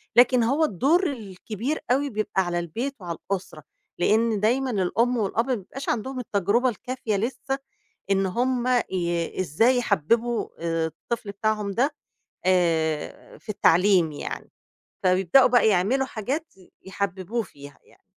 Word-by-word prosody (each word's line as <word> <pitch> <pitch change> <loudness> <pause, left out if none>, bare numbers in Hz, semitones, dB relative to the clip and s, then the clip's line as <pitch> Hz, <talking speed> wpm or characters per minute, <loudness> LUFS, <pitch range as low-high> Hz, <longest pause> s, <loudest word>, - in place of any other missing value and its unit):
لكن 245 0 +6
هو 275 +7 +2
الدور 310 - +2
الكبير 220 +4 -4
أوي 280 +3 +2
بيبقى 210 -4 -1
على 175 0 -1
البيت 230 - -4
وعلى 170 -2 -5
الأسرة. 185 -5 -4 0.4
لإن 220 +3 +2
دايمًا 250 +5 +1
الأم 230 +5 +1
والأب 225 +3 0
ما 255 - +1
بيبقاش 235 +7 -7
عندهم 255 +3 -2
التجربة 215 +2 +1
الكافية 240 -2 -3
لسه، 270 +5 -2 0.5
إن 195 0 +3
هم 245 +5 0 0.2
ي 170 -2 -2
إزاي 225 - +3
يحبّبوا 230 +3 +1
الطفل 165 +6 -3
بتاعهم 210 -1 -1
ده 270 +8 +1 0.5
آآ 165 -4 0
في - - -28
التعليم 180 -4 +4
يعني. 145 - -6 0.5
فبيبدأوا 185 +7 +5
بقى 245 -2 +4
يعملوا 215 +7 +2
حاجات 265 +8 -4 0.3
يحببوه 195 +3 -2
فيها 145 -4 -14
يعني. - - -25
215 Hz, 130 wpm, -25 LUFS, 180-250 Hz, 0.5 s, لكن